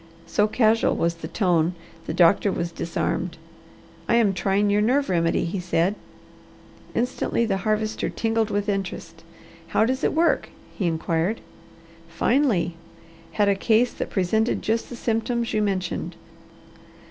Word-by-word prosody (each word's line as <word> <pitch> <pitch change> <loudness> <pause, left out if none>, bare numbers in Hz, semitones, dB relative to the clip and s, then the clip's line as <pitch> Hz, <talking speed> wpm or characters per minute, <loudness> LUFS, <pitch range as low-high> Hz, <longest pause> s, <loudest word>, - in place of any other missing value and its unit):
So 210 - +2
casual 220 0 +2
was 170 0 +1
the 170 - -8
tone 175 -4 +1 0.3
the - - -2
doctor 180 +3 +4
was 170 -2 -3
disarmed. 170 0 -2 0.7
"I - - +4
am 220 -4 +3
trying 200 +2 +1
your 205 +1 +3
nerve 265 +6 +2
remedy," 170 -2 +1
he 180 +3 -3
said. 180 +1 +1 1.0
Instantly 235 0 0
the 195 -3 0
Harvester 215 +2 -1
tingled 225 -1 0
with 205 0 -1
interest. 195 -2 -4 0.4
"How 220 - +2
does 260 +4 -1
it - - +2
work?" 335 +2 +2 0.2
he 185 - -1
inquired. 165 +5 -1 0.7
"Finely! 175 - +1 0.6
Had 205 -1 +2
a 200 - +4
case 225 +4 +2
that - - -4
presented 220 +5 0
just 225 +1 -1
the 245 - -7
symptoms 235 +1 -1
you 215 - +1
mentioned. 195 -3 -2
205 Hz, 140 wpm, -24 LUFS, 180-225 Hz, 1.0 s, doctor